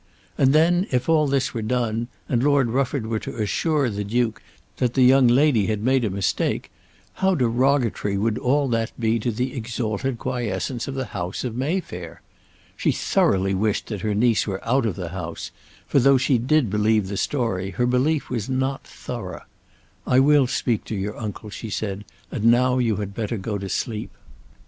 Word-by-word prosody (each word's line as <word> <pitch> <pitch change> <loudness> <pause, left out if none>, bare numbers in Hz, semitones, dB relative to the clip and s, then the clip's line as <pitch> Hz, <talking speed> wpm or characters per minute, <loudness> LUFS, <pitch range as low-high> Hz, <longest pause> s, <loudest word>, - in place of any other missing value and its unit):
And 135 -1 +4
then, 175 +5 +3
if 125 -1 0
all 155 -2 +3
this 135 -1 0
were 115 - -3
done, 115 0 -1 0.2
and 120 -2 +1
Lord 140 -3 +3
Rufford 130 -1 0
were 110 -1 -1
to - - -7
assure 145 +7 +1
the 105 -2 -3
Duke 110 +2 -1 0.4
that 125 -2 0
the 130 - +5
young 130 0 +6
lady 125 -4 +4
had 105 -1 -1
made 130 +1 +2
a 110 - +1
mistake, 95 -1 -1 0.5
how 190 0 +3
derogatory 125 -5 +1
would 105 +2 0
all 140 +3 +2
that 115 0 -2
be 115 0 +1
to 115 - -1
the 125 +3 -2
exalted 120 0 -2
quiescence 120 -1 -3
of 135 - -4
the 130 -1 -2
house 90 +1 -4
of 120 -3 -4
Mayfair! 125 - -4 0.5
She - - +1
thoroughly 95 0 +1
wished 105 +2 0
that 105 -4 -4
her 105 -2 -1
niece 115 +1 +2
were 95 +2 -4
out 125 0 +2
of 105 - -2
the 90 -3 -5
house; 85 -2 -6 0.3
for - - +2
though 135 +1 +5
she 130 -1 +2
did 130 -2 +2
believe 105 -1 +2
the 100 - -4
story, 95 -6 -1
her 120 +5 -1
belief 135 +5 +1
was 120 -2 -3
not 130 +1 -1
thorough. - - -7 0.6
"I 130 - +4
will 140 -1 +5
speak 120 -3 -1
to 110 - -4
your 105 +2 -3
uncle," 105 -1 -6
she 110 - -7
said. 100 0 -4 0.3
"And 105 - -3
now 125 +2 +4
you 115 -4 +1
had 100 -1 -4
better 110 +1 -3
go 100 +1 -3
to 95 0 -5
sleep." 110 +1 -3
120 Hz, 185 wpm, -23 LUFS, 105-130 Hz, 0.6 s, young